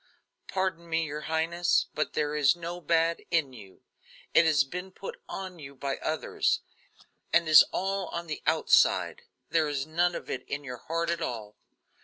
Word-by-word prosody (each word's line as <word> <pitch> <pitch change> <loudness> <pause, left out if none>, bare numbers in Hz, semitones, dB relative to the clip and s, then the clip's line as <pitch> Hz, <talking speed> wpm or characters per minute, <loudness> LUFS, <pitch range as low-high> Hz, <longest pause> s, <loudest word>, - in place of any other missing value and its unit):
"Pardon 185 -3 -2
me, 165 0 +1
your 150 0 -5
highness; 165 +2 +2
but 155 - -2
there 150 -1 0
is 150 +1 +4
no 175 +1 -6
bad 165 0 +2
in 155 -6 +1
you. 100 -6 -14 0.5
It 165 - +6
has 150 -3 +4
been 180 +7 -7
put 195 - -8
on 185 -2 -6
you 140 -2 -10
by 135 +1 -3
others, 155 0 0 0.7
and 170 -1 +3
is 155 -3 +10
all 195 0 -1
on 170 +1 -5
the 155 -2 -5
outside; - - +3 0.3
there 160 -2 +3
is 140 -2 -2
none 170 +3 +1
of - - -6
it 130 - -3
in 145 +1 -3
your 125 -3 -6
heart 165 +6 -2
at 170 -1 -2
all. 110 -7 -4
160 Hz, 175 wpm, -28 LUFS, 145-170 Hz, 0.7 s, is